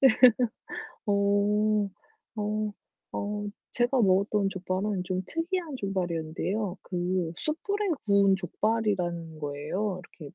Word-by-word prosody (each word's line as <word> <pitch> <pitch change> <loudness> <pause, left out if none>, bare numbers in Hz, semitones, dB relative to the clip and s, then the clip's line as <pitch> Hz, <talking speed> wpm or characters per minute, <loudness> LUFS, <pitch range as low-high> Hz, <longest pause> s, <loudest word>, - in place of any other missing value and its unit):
그래서 265 -5 +6 0.9
어. 205 +1 +3 0.5
어. 215 0 0 0.4
어. 205 0 -2 0.3
제가 245 +2 +3
먹었던 200 +1 +3
족발은 190 +1 -1
좀 185 0 -1
특이한 330 -2 -2
족발이었는데요. 185 0 -2
그 180 -2 -1
숯불에 400 +7 -1 0.2
구운 200 -1 +5
족발이라는 180 -4 -1
거예요, 155 +7 -2 0.2
이렇게 145 -3 -9
200 Hz, 245 characters per minute, -28 LUFS, 180-215 Hz, 0.9 s, 그래서